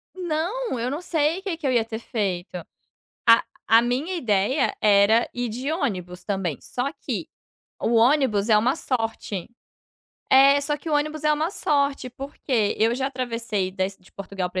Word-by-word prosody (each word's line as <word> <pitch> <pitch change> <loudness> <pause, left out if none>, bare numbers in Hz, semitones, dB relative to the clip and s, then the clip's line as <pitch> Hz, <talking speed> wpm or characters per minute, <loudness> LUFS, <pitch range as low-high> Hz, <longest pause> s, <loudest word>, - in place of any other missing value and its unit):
Não, 355 - -2
eu 245 +2 -1
não 295 +5 -4
sei 320 0 0
o - - -16
que 360 -5 -3
que 300 -4 -3
eu - - +2
ia 235 -2 +2
ter 225 0 -5
feito. 190 -6 -3 0.7
A 230 0 +7 0.2
a 225 +1 +6
minha 265 +10 -1
ideia 240 - +1
era 210 +2 +4
ir 245 0 -2
de 255 +7 -3
ônibus 180 - -3
também, 190 -8 -2
só 260 +3 -3
que - - -5 0.5
o 235 - 0
ônibus 235 -4 +3
é 215 - +6
uma 250 +8 +2
sorte 225 - -3 0.9
é, 275 +1 +7
só 295 0 -1
que 320 - -8
o 300 - +1
ônibus 305 +1 -1
é 300 - +4
uma 310 +4 0
sorte. 280 -7 0
Por 275 +3 -9
quê? 225 -7 +1
Eu 225 +2 +3
já 265 +1 -1
atravessei 230 -7 -2
da 185 0 -1
Es 195 0 -6
de 185 - -21
Portugal 195 -2 -5
para 185 0 -3
245 Hz, 185 wpm, -24 LUFS, 210-295 Hz, 0.9 s, A